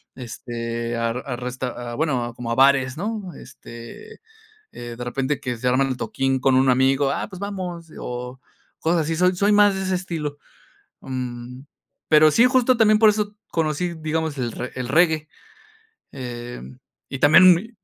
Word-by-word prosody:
este, 115 -1 -5
a 115 0 0
a 125 +1 -5
resta 125 -1 -5
ah, - - -5
bueno, 130 -6 -1
como 120 -1 -5
a - - 0
bares, 135 0 +3
¿no? 205 -1 -4
Este, 115 - -12 0.6
eh, 120 -1 -8
de 120 - -5
repente 135 +3 -2
que 125 -3 -3
se 115 - -8
arman 130 +2 +2
el 130 - -2
toquín 135 0 -1
con 130 0 +3
un 130 0 +4
amigo 135 +2 +3
"ah, - - -3
pues 185 -3 -10
vamos", 180 -5 -6
o 125 +1 -6 0.4
cosas 165 +1 +1
así. 160 +1 -2
Soy 180 +1 +3
soy 200 +3 +2
más 205 -1 +5
de 190 - -3
ese 190 0 0
estilo, 160 -5 -4 0.6
mm, 125 -1 -6 0.5
pero 155 0 +7
sí, 230 +10 +5
justo 255 -1 +3
también 215 -2 +4
por 220 -1 +7
eso 210 0 -1
conocí, 165 +2 -1
digamos, 160 -1 -3
el 120 -3 -2
re 125 - -6
el 125 -1 -4
reggae. 160 0 +3 0.9
Em, 120 - -8 0.3
y 135 - -4
también 180 +5 +8
mi 200 +7 -5
140 Hz, 170 wpm, -22 LUFS, 125-180 Hz, 0.9 s, también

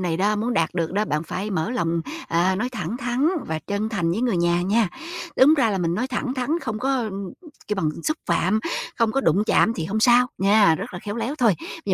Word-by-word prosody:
này 175 -3 -1
đó, 205 +4 +1
muốn 235 +3 -1
đạt 165 0 0
được 165 -2 -1
đó, 205 +2 +1
bạn 150 -6 -1
phải 180 +5 -4
mở 180 +1 -1
lòng, 170 -8 0 0.3
à, 175 +3 +2
nói 245 +5 -1
thẳng 210 -2 -4
thắn 250 +4 0 0.2
và 160 0 -2
chân 205 +1 -1
thành 180 -7 -1
với 185 +7 -1
người 240 -6 +1
nhà 175 0 +2
nha. 210 +2 +2 0.5
Đúng 285 +4 +7
ra 255 -7 +2
là 195 - -1
mình 170 -1 0
nói 245 +7 -1
thẳng 260 -1 -2
thắn, 275 +6 -1
không 220 -7 -4
có, 255 -3 0 0.6
kêu 210 - -1
bằng, 160 -5 0 0.2
xúc 310 - 0
phạm, 185 +5 +1 0.4
không 230 -2 +2
có 270 - +1
đụng 210 -5 +2
chạm 225 - +3
thì 165 - -3
hông 205 +6 -2
sao 245 +2 +5
nha, 200 -2 +5
rất - - -6
là - - -4
khéo 205 +4 -6
léo 235 +5 -2
thôi, 235 -8 +3
bây 195 - -5
210 Hz, 240 wpm, -23 LUFS, 175-240 Hz, 0.6 s, Đúng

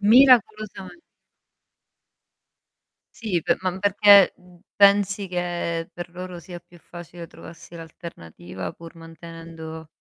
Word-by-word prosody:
Miracolosame 215 - +3 2.2
Sì, 205 -7 -2
pe - - +1
ma 185 0 -3
perché, 200 0 +6
mhmm, 180 -1 -21 0.2
pensi 200 0 +3
che 175 -2 -3
per 175 0 -8
loro 180 0 -8
sia 175 0 -10
più 175 0 -20
facile 175 0 -11
trovarsi 165 +1 -14
l'alternativa, 125 - -9
pur 165 0 -13
mantenendo 165 -1 -11
175 Hz, 100 wpm, -23 LUFS, 165-195 Hz, 2.2 s, perché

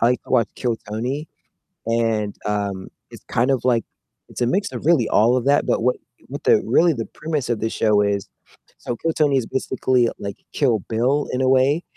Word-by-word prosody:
I 115 - +4
like 125 +1 +1
to - - -16
watch 120 -3 +3
Kill 120 -2 -1
Tony, 125 +9 -3 0.6
and, 115 -3 0
um, 100 -2 -2 0.2
it's - - -13
kind 120 +4 0
of 130 -3 0
like 120 -3 +2 0.4
it's - - -9
a 120 - +2
mix 195 +10 0
of 125 +3 -6
really 155 -9 +4
all 115 +4 +4
of 125 - -1
that, 145 +1 +3
but - - +1
what 125 +1 +2 0.3
what 140 +2 -7
the - - +4
really 170 0 +4
the 115 -6 -4
premise 155 -5 -4
of 120 -2 0
the 110 - 0
show 105 -2 +2
is 100 -1 -1 0.5
so 120 - -4
Kill 165 +7 -1
Tony 145 -3 +2
is 125 - 0
basically 130 -1 +1
like 100 -1 -6 0.2
Kill 120 -7 +1
Bill 130 +6 +1
in 125 - -1
a 130 - +2
way, 135 +5 +3
125 Hz, 210 wpm, -21 LUFS, 110-135 Hz, 0.6 s, I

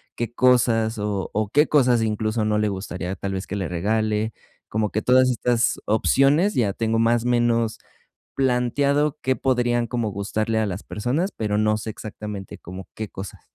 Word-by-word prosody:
qué 120 -1 -3
cosas, 120 -3 +3
o 105 -2 -2
o, 105 -1 -1
qué 150 +7 +4
cosas 125 -5 +3
incluso 110 0 -1
no 105 0 +1
le 105 0 +1
gustaría 95 -1 -4
tal 95 +2 -4
vez 95 0 -3
que 100 - -4
le 95 -4 -2
regale. 110 +4 0 0.4
Como 105 -1 0
que 110 - -1
todas 130 0 +4
estas 120 -1 +1
opciones, 140 - +3
ya 105 -6 +1
tengo 115 +1 0
más 115 +1 +2
menos 120 -2 +1 0.6
planteado 140 +3 +1
qué 130 +1 +1
podrían 120 -2 +1
como 115 -1 -2
gustarle 110 +3 -1
a 110 - +1
las 95 -1 -4
personas, 135 - -2
pero 105 -1 -1
no 110 0 +2
sé 110 +1 -5
exactamente 105 -2 -7
como 95 +2 -9
qué 110 -2 -5
cosas. 95 0 -8
110 Hz, 175 wpm, -23 LUFS, 105-125 Hz, 0.6 s, qué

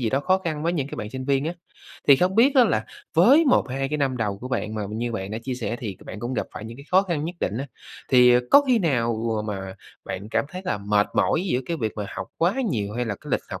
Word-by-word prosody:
gì 115 -3 0
đó 135 - +1
khó 185 +5 +2
khăn 160 -5 -4
với 170 +1 +1
những 140 -6 -1
cái - - -7
bạn 105 -2 -5
sinh 130 0 -5
viên 140 +1 +1
á. 165 - -1 0.6
Thì 140 - +9
không 185 +4 +1
biết 265 +6 +5
á, 255 - +7
là 110 - +1 0.3
với 260 - +6
1-2 135 - +1
cái 150 +1 -2
năm 135 -2 0
đầu 105 -4 -2
của 125 +4 -7
bạn, 110 -4 -2
mà 105 - -2
như 115 +2 -3
bạn 95 -1 -4
đã 110 - -3
chia 130 -1 -3
sẻ 120 -1 -3
thì 100 -6 -5
bạn 105 - -8
cũng 120 +2 -3
gặp - - -2
phải - - -7
những 115 +1 -8
cái 140 - -12
khó 190 +2 +5
khăn 165 -6 -2
nhất 175 +2 -4
định 105 +6 -1
á, 140 - -4 0.4
thì, 125 -1 +7
ờ, 125 - +5
có 285 - +8
khi 245 -3 +4
nào 120 - +1 0.3
mà 95 -2 -5 0.3
bạn 95 +2 -6
cảm - - +1
thấy 185 +3 -7
là 180 - -1
mệt 105 0 +2
mỏi 170 - +2
giữa 130 -9 0
cái 170 - -2
việc 110 -7 -2
mà 105 -1 -3
học 95 - -4
quá 175 +6 +2 0.2
nhiều? 105 -4 -2
Hay 125 0 -1
là 110 - -2
cái - - -10
lịch - - +1
học - - -5
130 Hz, 285 wpm, -24 LUFS, 110-165 Hz, 0.6 s, Thì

